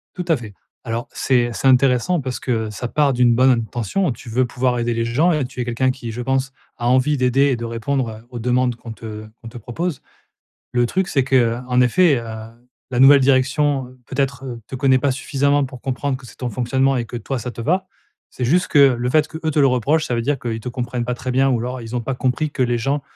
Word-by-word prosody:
Tout 180 - -4
à 165 - +4
fait. 110 -5 -9 0.3
Alors 115 0 -4
c'est 120 -3 +1
c'est 125 - -3
intéressant 130 +6 +3
parce 130 -2 -4
que, - - -5 0.2
heu, - - -6
ça 120 +3 -5
part 145 +1 +2
d'une 120 -1 +3
bonne 130 +2 +5
intention. 120 - 0
Tu 115 - -12
veux 125 +3 +1
pouvoir 125 +1 0
aider 120 0 -1
les 115 0 -1
gens 145 +10 +2
et 150 -4 0
tu 125 0 -7
es - - 0
quelqu'un 125 +2 0
qui, 125 -3 -6
je 125 - -5
pense, 135 +1 -1 0.2
a 120 - -2
envie 130 +4 +3
d'aider 130 +1 +2
et 135 -3 +1
de 115 - -6
répondre 115 -1 -3
aux 120 - -6
demandes 125 +1 +1
qu'on 115 -1 -9
te 110 -1 -8 0.2
qu'on 115 - -8
te 120 - -9
propose. 140 - -4 0.7
Le 120 -1 +2
truc 190 +8 -1
c'est 135 -3 +2
que, 135 0 0
heu, 120 -1 +3
en 125 0 +3
effet, 145 +3 +4
heu, 115 - -7 0.7
la 125 -1 -2
nouvelle 140 +1 +8
direction, 135 0 +1
peut-être, 135 0 -2 0.2
te - - -6
connaît 130 0 +3
pas 140 0 +1
suffisamment 140 +2 +1
pour 130 -2 -10
comprendre 135 +1 -2
que 130 - -15
c'est - - -14
ton 125 -1 -3
fonctionnement 130 +4 +1
et 120 - 0
que, 120 - -6
toi, 135 +2 -4
ça 120 +2 -5
te - - -12
va. 180 +10 0 0.4
C'est 125 - -4
juste 175 +8 +2
que 145 - +3
le 125 -3 +4
fait 155 +3 +3
que, 160 - -8
eux, 155 - 0
te 150 - +1
le 140 - +5
reprochent, 140 +6 +1
ça 125 - -1
veut 115 - 0
dire 140 +4 -1
qu'ils 115 -2 -4
te 125 - -5
comprennent 120 0 -3
pas 125 +1 -2
très 130 +1 -4
bien, 135 +2 +3
ou 125 - +1
alors 125 +1 -4
ils 115 +2 -7
ont - - -2
pas 130 +3 -3
compris 130 +4 -1
que 130 - -4
les 120 -1 0
gens, 135 +5 -1
125 Hz, 250 wpm, -20 LUFS, 120-135 Hz, 0.7 s, nouvelle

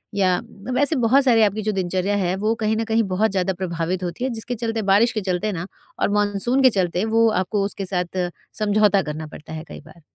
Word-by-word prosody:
या 185 -2 +3
अ, 230 0 -9
वैसे 285 +4 +3
बहुत 255 +3 +3
सारे 235 -4 +4
आपकी 210 +1 +1
जो 215 - 0
दिनचर्या 190 +1 -1
है 185 -1 0
वो 215 +3 +1
कहीं 215 +1 +2
न 225 - 0
कहीं 225 0 +2
बहुत 215 +2 +2
ज़्यादा 190 -1 0
प्रभावित 175 0 -3
होती 175 +7 -4
है, 260 - 0
जिसके 235 +1 -4
चलते 225 -1 -2
बारिश 225 +5 +5
के 215 - -2
चलते 185 +3 -1
ना 175 -3 -4 0.4
और - - +2
मानसून 205 +6 +1
के 260 - +8
चलते 185 -2 0
वो 230 0 +5
आपको 200 +2 -1
उसके 200 -1 -3
साथ 180 -1 -1 0.3
समझौता 210 -1 +3
करना 155 0 -5
पड़ता 155 +1 -11
है 155 - -6
कई - - -9
बार। 170 - -17
200 Hz, 225 wpm, -22 LUFS, 180-225 Hz, 0.4 s, के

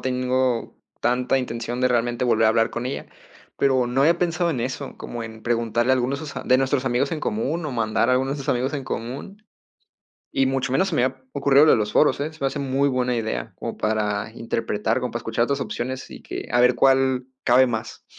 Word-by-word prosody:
tengo 125 -1 0 0.3
tanta 125 +2 +2
intención 120 -1 -4
de 125 - +4
realmente 120 0 0
volver 115 -2 +3
a - - +5
hablar 115 +1 +2
con 120 +1 -4
ella. 130 - -4 0.5
Pero 130 -3 +3
no 125 +2 0
había 165 +5 +4
pensado 175 0 0
en 130 -7 -2
eso, 130 +3 -4
como 120 -1 -6
en 110 -1 -9
preguntarle 120 +1 +1
a - - +6
algunos 130 +2 -1
de 155 - -6
sus 145 - -9
a - - -6
de 130 - +4
nuestros 135 0 +1
amigos 125 +7 +1
en 155 - -3
común, 150 +10 -2
o - - -3
mandar 110 -2 +1
a 130 - +4
algunos 130 +1 +1
de 140 - -2
nuestros 135 - 0
amigos 130 +4 -1
en 140 -3 -4
común. 130 - -6 0.9
Y 135 0 +2
mucho 135 0 -1
menos 190 +8 +2
se 180 - -3
me 125 - +3
había 130 0 -3
ocurrido 140 0 +5
lo - - +6
de - - +5
los 105 -2 -1
foros 150 - +4
¿eh? 150 +3 -3
Se 155 - -17
me 140 - +1
hace 140 - -5
muy 140 0 +1
buena 125 -2 0
idea, 110 -2 -3
como - - -5
para 105 -1 -1
interpretar, 115 -1 -1
como 125 - -2
para 120 - -2
escuchar 115 +1 0
otras 140 +2 -1
opciones, 130 0 -4
y - - -10
que - - -6
a 120 - +3
ver 125 0 +5
cuál 130 -1 +3 0.2
cabe 130 +1 +5
más. 110 -2 -5
125 Hz, 235 wpm, -23 LUFS, 120-135 Hz, 0.9 s, a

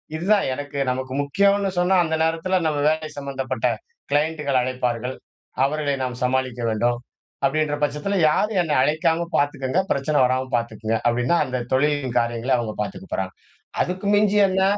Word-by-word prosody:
இதுதான் 195 +5 +2
எனக்கு 145 +1 -6
நமக்கு 130 0 -4
முக்கியோன்னு 200 +7 +2
சொன்னா, 180 +2 +3
அந்த 160 -1 -1
நேரத்தில 165 +3 +1
நம்ம 150 -2 0
வேலை 155 0 -1
சம்மந்தப்பட்ட 135 -3 -3 0.5
க்ளையண்டுகள் 145 -2 +1
அழைப்பார்கள். 125 0 -2 0.5
அவர்களை 145 +1 0
நாம் 125 -1 -4
சமாளிக்க 130 -1 0
வேண்டும். 120 +2 +1 0.5
அப்பிடின்ற 150 +1 +1
பட்சத்தில 150 +7 -1
யாரும் 210 +6 +1
என்னை 155 -4 0
அழைக்காம 160 +3 +1
பார்த்துக்கங்க. 145 +2 0
பிரச்சனை 140 +2 +1
வராம 130 +1 0
பார்த்துக்கங்க 115 -1 -1
அப்பிடின்னா, 125 +7 +2
அந்த 125 -1 -3
தொழிலின் 140 -2 +1
காரியங்களை 120 +2 -1
அவுங்க 110 -3 -3
பார்த்துக்க 100 -2 -6
போறாங்க. 95 0 -2 0.5
அதுக்கு 185 +3 -5
மிஞ்சி 210 0 +3
என்ன? 190 0 +1
140 Hz, 140 wpm, -23 LUFS, 125-160 Hz, 0.5 s, சொன்னா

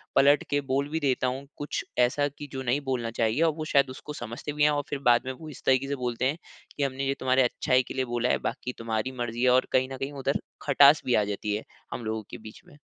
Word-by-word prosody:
पलट 145 +1 +5
के 145 - +2
बोल 140 +2 +1
भी 160 +2 -1
देता 130 -3 +1
हूँ 130 +2 -3
कुछ 145 - -3 0.2
ऐसा 135 +4 +3
कि 145 +1 -10
जो 130 - -3
नहीं 130 +2 +1
बोलना 125 -3 -1
चाहिए 115 +4 0
और 165 - +4
वो 155 - -3
शायद 140 -3 +3
उसको 140 +3 -8
समझते 120 +3 -6
भी 150 - +1
हैं 150 - +6
और 145 -1 0
फिर 140 - -3
बाद 120 -1 +5
में - - -1
वो 155 +4 -10
इस 140 - -12
तरीके 135 +1 +3
से 140 - 0
बोलते 125 -2 -2
हैं 145 +5 +1 0.4
कि 145 - 0
हमने 135 0 -2
ये 135 - +2
तुम्हारे 130 0 +3
अच्छाई 125 +1 +2
के - - -6
लिए 130 -1 0
बोला 120 0 -1
है, - - +3
बाकी 125 - -4
तुम्हारी 115 +2 -2
मर्ज़ी 120 +1 -2
है 130 - +5
और 130 +1 +3
कहीं 130 0 +3
न - - -6
कहीं 135 +2 -4
उधर 140 0 -1 0.2
खटास 140 +1 +6
भी 125 - +2
आ 105 - +3
जाती 105 +1 -2
है 110 - -4 0.3
हम 120 - -5
लोगों 110 0 -2
के - - -6
बीच - - -15
में। 145 - -17
130 Hz, 270 wpm, -27 LUFS, 120-140 Hz, 0.4 s, हैं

